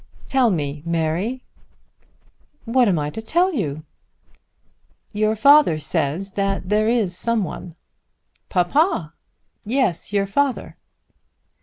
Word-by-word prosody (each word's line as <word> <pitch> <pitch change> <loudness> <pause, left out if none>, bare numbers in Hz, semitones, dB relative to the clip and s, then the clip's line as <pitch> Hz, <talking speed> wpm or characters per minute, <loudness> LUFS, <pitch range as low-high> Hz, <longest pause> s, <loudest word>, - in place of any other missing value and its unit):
"Tell 260 -3 +2
me, 145 -5 -3
Mary." 170 +9 -2 1.2
"What 245 +1 +3
am 185 -4 +2
I 150 0 -2
to 220 - -6
tell 350 +11 +1
you?" 155 - -3 1.3
"Your 215 +1 +1
father 280 - +5
says 155 +5 -2
that 195 -2 -2
there 215 +1 +2
is 220 -7 +1
some 230 +2 +1
one." 175 0 -7 0.7
"Papa!" 180 - +1 0.5
"Yes; 225 - 0
your 200 -1 +1
father." 270 +6 -1
200 Hz, 110 wpm, -21 LUFS, 170-240 Hz, 1.3 s, father